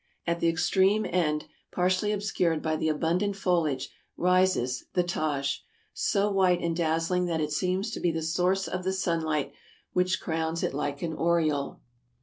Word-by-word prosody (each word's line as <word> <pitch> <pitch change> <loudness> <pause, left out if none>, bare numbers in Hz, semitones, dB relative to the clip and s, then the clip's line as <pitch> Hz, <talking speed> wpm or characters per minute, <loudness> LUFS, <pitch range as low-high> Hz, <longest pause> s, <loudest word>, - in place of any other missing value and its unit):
At 170 0 0
the 170 - +3
extreme 190 +5 +2
end, 155 -3 0 0.3
partially 185 +3 +1
obscured 185 -6 0
by 155 -1 0
the 160 0 0
abundant 175 +6 0
foliage, 170 -8 0 0.3
rises 180 -9 +2
the 180 - +3
Taj, 145 -5 -1 0.3
so 200 -1 +1
white 185 -2 +3
and 170 -1 -1
dazzling 165 +2 +1
that 170 -2 -1
it 150 -1 -1
seems 185 +7 0
to - - -4
be 175 - +1
the 160 0 -3
source 180 +4 +1
of 185 0 -3
the 190 +1 0
sunlight 165 -5 -1 0.4
which 180 +1 +1
crowns 160 0 -2
it - - 0
like 145 +1 -3
an 165 -1 -2
aureole. 155 -4 0
170 Hz, 160 wpm, -28 LUFS, 160-185 Hz, 0.4 s, the